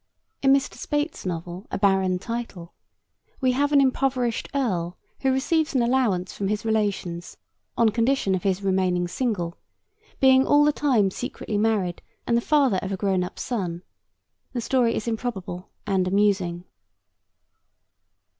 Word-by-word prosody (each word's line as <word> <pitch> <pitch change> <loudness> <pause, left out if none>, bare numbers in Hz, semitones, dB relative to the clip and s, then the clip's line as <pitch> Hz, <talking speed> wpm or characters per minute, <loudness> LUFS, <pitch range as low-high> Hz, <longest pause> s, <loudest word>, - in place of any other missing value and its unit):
In 270 - +4
Mr. 275 0 +2
Speight's 295 - -2
novel, 175 +2 -5
A - - -3
Barren 190 -2 +2
Title, 205 -5 -6 0.7
we 260 -2 +2
have 285 +3 +1
an 285 - +6
impoverished 260 -3 +1
earl 180 -10 -1 0.2
who 265 - +2
receives 300 +3 +1
an 250 - +3
allowance 235 -8 +1
from 200 - -3
his 210 +2 -2
relations 200 -6 -2 0.4
on 230 -1 +5
condition 230 -2 +1
of 185 - 0
his 195 +1 0
remaining 185 -2 +1
single, 180 -4 -2 0.6
being 265 0 +6
all 290 +1 +4
the 300 - +3
time 235 -11 +2
secretly 215 -1 -4
married 205 -5 0 0.2
and 235 - +1
the 235 - +3
father 275 -7 +3
of 190 - -4
a 195 - -2
grown 190 -2 +1
up 180 - -7
son. 180 -7 -3 0.7
The 240 - -2
story 240 -1 +2
is 220 - -3
improbable 200 -6 -4 0.2
and 190 -3 +1
amusing. 190 -3 +1
210 Hz, 145 wpm, -24 LUFS, 185-255 Hz, 0.7 s, an